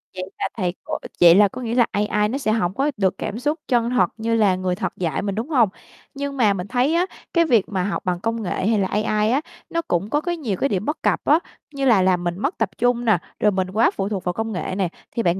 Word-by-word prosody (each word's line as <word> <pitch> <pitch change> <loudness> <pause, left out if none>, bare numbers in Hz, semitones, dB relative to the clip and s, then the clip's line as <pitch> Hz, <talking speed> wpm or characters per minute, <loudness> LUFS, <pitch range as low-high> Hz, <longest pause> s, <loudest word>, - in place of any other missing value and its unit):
vậy 185 - -4 0.2
là - - 0
thầy 180 -3 -1
cô - - -3 0.2
vậy 170 0 +9
là 205 +1 +6
có 250 +6 -8
nghĩa 235 -1 -2
là 240 -2 +5
AI 210 0 +1
nó 260 - -2
sẽ 245 -6 0
hổng 190 -5 0
có 275 +8 0
được 190 -2 +1
cảm 225 - -4
xúc 295 +5 -1
chân 240 -2 +2
thật 250 -1 +2
như 230 +1 0
là 205 -4 +3
người 185 -1 -1
thật 210 - -3
dạy 170 -3 -1
mình, 200 -1 -3
đúng 230 +7 -3
hông? 245 -9 +4 0.4
Nhưng 280 0 -4
mà 215 -5 +4
mình 180 0 -5
thấy 255 +6 +1
á, 350 +2 +3 0.3
cái 335 -1 +4
việc 230 - +2
mà 190 -3 -1
học 200 - -3
bằng 180 -1 0
công 225 +3 -2
nghệ 185 +1 -2
hay 220 -2 +2
là 190 - +1
AI 210 +2 +1
á, 270 +4 +2 0.3
nó 335 - -1
cũng 190 - -1
có, 295 +4 +1
cái, 345 +1 -2
nhiều 225 - -3
cái 275 - 0
điểm 195 0 -1
bất 300 +1 -3
cập - - +2
á, 305 +3 +5 0.4
như 275 -1 -1
là 225 -7 +5
làm 185 -1 +2
mình 175 0 -2
mất 280 - -1
tập 225 -4 0
trung 245 0 +1
nè, 215 -5 +4 0.2
rồi 210 - +3
mình 185 -1 -1
quá 220 +4 +3
phụ 195 0 -3
thuộc 200 -4 -3
vào 180 - -1
công 225 +3 -3
nghệ 185 -1 -3
nè, 190 -3 0 0.3
thì 230 - 0
bạn 175 +1 +1
215 Hz, 280 wpm, -22 LUFS, 190-250 Hz, 0.4 s, vậy